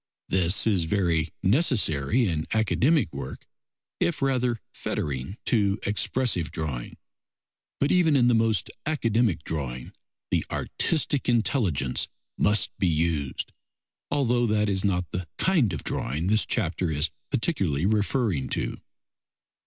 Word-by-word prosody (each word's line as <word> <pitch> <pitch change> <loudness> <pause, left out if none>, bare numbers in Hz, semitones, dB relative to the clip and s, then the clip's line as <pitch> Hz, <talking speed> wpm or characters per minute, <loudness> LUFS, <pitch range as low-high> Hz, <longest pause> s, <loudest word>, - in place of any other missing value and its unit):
This 90 +1 +2
is 95 -7 +2
very 85 -4 +1
necessary 105 - +2
in 80 -3 -2
academic 120 - +2
work, 70 -2 -7 0.5
if 175 - 0
rather 125 -3 +1
fettering 70 - -4
to 100 -4 +2
expressive 110 -4 0
drawing; 70 -7 -4 0.8
but 140 - +2
even 170 -5 +4
in 125 -3 +4
the 125 - +4
most 115 -1 +1 0.2
academic 115 - +1
drawing 65 -5 -4 0.4
the - - +2
artistic 145 -4 -1
intelligence 105 - +1 0.3
must 105 0 +1
be 95 - +2
used, 80 -4 -1 0.6
although 125 -4 +2
that 105 -1 +2
is 95 -1 0
not 90 -3 +1
the 90 -1 -4
kind 160 - +3
of 85 - -4
drawing 75 +6 -2
this 105 +3 +2
chapter 90 -5 0
is 75 +1 0 0.2
particularly 95 - 0
referring 105 - +1
to. - - -2
100 Hz, 120 wpm, -26 LUFS, 80-120 Hz, 0.8 s, even